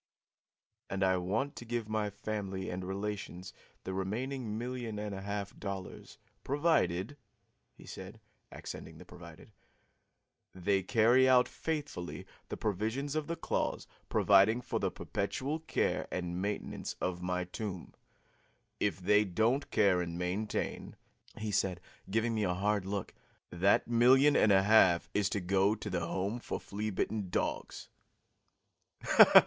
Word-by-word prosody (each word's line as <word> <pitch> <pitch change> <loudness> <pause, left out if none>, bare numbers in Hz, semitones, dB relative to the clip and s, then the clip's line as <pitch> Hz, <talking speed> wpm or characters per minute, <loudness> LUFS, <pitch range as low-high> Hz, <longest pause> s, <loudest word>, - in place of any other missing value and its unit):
"And 95 0 -1
I 95 -1 +3
want 105 +11 -1
to - - -6
give 120 -1 -3
my 110 -1 -1
family 100 -2 -4
and 90 +1 -4
relations 95 -1 -5 0.3
the 95 - -4
remaining 110 +4 -3
million 120 -2 -4
and 105 -1 -4
a 95 - -5
half 100 0 -4
dollars, 100 -2 -7 0.3
provided," 140 - +1 0.6
he - - -15
said, - - -9 0.3
accenting - - -8
the - - -12
'provided,' - - -13 1.0
"they 95 +2 +1
carry 120 +6 +4
out 125 -1 +6
faithfully 145 - -4 0.2
the - - -4
provisions 110 +8 -1
of 155 -1 -1
the 170 - -2
clause - - -2 0.2
providing 100 +4 +5
for 120 - -2
the - - 0
perpetual 130 +9 -3
care 160 - -1
and 90 0 -3
maintenance 100 +1 -3
of 90 -1 -2
my 90 0 -1
tomb. 90 0 -6 0.9
If 85 - 0
they 105 +3 +4
don't 110 +8 +1
care 95 -4 +3
and 85 -1 -4
maintain," 90 +5 -3 0.4
he 110 -1 -3
said, 95 -3 0 0.3
giving 115 +3 +1
me 110 -1 0
a 90 -2 +1
hard 100 0 0
look, 100 -1 -3 0.4
"that 95 +3 +3
million 130 +5 +5
and 110 - +5
a 95 -1 +5
half 95 -5 +5
is 105 -2 +2
to 100 - -1
go 95 +3 +2
to 105 -1 -6
the 85 -2 -1
Home 100 +7 -2
for - - -4
Flea 105 +2 -4
Bitten 105 0 -2
Dogs." - - -3
105 Hz, 140 wpm, -32 LUFS, 95-115 Hz, 1.0 s, out